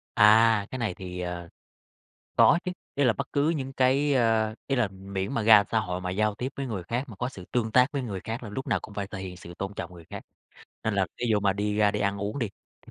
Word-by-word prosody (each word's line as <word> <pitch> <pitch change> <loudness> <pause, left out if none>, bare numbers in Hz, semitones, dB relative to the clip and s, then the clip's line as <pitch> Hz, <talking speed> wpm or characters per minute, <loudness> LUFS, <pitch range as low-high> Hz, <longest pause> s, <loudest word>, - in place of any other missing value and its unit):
À, 110 0 +6
cái 130 - -5
này 110 -7 -1
thì, 90 -1 -7
ờ, 90 -1 -5 0.9
có 170 - +6
chứ. 180 - -2 0.2
Ý 140 - +2
là 120 - +5
bất - - -5
cứ 145 +2 +2
những 135 -5 -3
cái, 135 +2 +2
ơ 110 -3 +2
ý 135 - 0
là 120 -5 +2
miễn 95 +1 -5
mà 115 - 0
ra 110 -2 +8
xã 110 - +2
hội 90 -3 -3
mà 90 0 -3
giao 105 +2 +1
tiếp 125 +5 -4
với 140 - -3
người 105 -7 -4
khác 120 +9 -2
mà 110 - -10
có 125 +4 -2
sự 95 -8 -10
tương 115 -3 0
tác 125 +4 +5
với 140 - -1
người 100 -6 -4
khác 115 +3 -4
là 110 - -6
lúc 130 +6 -5
nào - - +1
cũng 105 - -10
phải 100 -1 -3
thể 100 -1 -7
hiện 90 -1 -7
sự 85 -1 -11
tôn 100 +1 -4
trọng 90 -2 -6
người 85 -2 -12
khác. - - -6 0.6
Nên 110 - 0
là 95 -2 +2
ví 120 - 0
dụ 105 - +3
mà 100 -1 +2
đi 105 +1 -1
ra 105 -1 +4
đi 105 0 -3
ăn 100 0 0
uống 105 +6 -3
đi, 115 -5 -1 0.3
thì - - -16
105 Hz, 275 wpm, -27 LUFS, 95-125 Hz, 0.9 s, ra